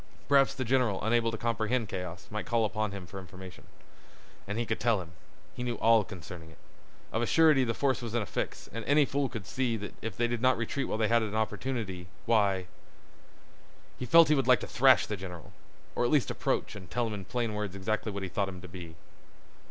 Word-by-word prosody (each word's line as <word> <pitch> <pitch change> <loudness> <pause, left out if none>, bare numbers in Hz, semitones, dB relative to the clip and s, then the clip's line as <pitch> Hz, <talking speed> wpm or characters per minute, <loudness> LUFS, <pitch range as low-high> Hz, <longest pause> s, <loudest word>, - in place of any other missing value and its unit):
Perhaps 140 -1 +4
the 130 -1 -2
general, 125 -5 +2
unable 115 +1 +2
to 110 - -4
comprehend 115 +1 0
chaos, 90 -2 -6
might 105 0 -4
call 115 -1 +2
upon 110 0 -1
him 100 -2 -7
for 95 +2 -8
information. 95 0 -11 0.8
And 105 +2 -3
he 120 - 0
could - - -2
tell 115 -4 +2
him. 85 -2 -8 0.4
He - - -7
knew 120 -1 -1
all 115 -1 +4
concerning 85 -3 -9
it. 80 - -17 0.6
Of 115 - +1
a 120 - 0
surety 155 -5 +5
the 115 -2 -1
force 135 -3 +1
was 115 -1 -5
in 120 - +2
a - - -5
fix, - - -4
and 115 0 -4
any 145 +1 +4
fool 140 -1 -1
could 115 -6 -6
see 120 +3 -1
that 105 -1 -7
if 115 - -5
they 120 - +2
did 120 -1 -2
not 130 0 +4
retreat 125 +4 -2
while - - -2
they 110 -1 +2
had 115 +1 +4
opportunity—why— 105 -3 -1 1.3
He 125 - -3
felt 165 +7 +8
that - - +1
he - - +6
would 135 -2 0
like 125 -4 +5
to - - -5
thrash 130 +1 +5
the 105 - -3
general, 90 -3 -9 0.4
or - - 0
at 120 - +2
least 145 -2 +2
approach - - -1
and 95 -4 -10
tell 120 -1 0
him 110 - -3
in 100 -2 -5
plain 115 +2 -2
words 105 -2 -3
exactly 110 +3 -2
what 100 -1 -5
he 95 - -3
thought 100 +2 -1
him 95 -1 -8
to 95 - -9
be. 85 -2 -9
110 Hz, 225 wpm, -30 LUFS, 95-120 Hz, 1.3 s, felt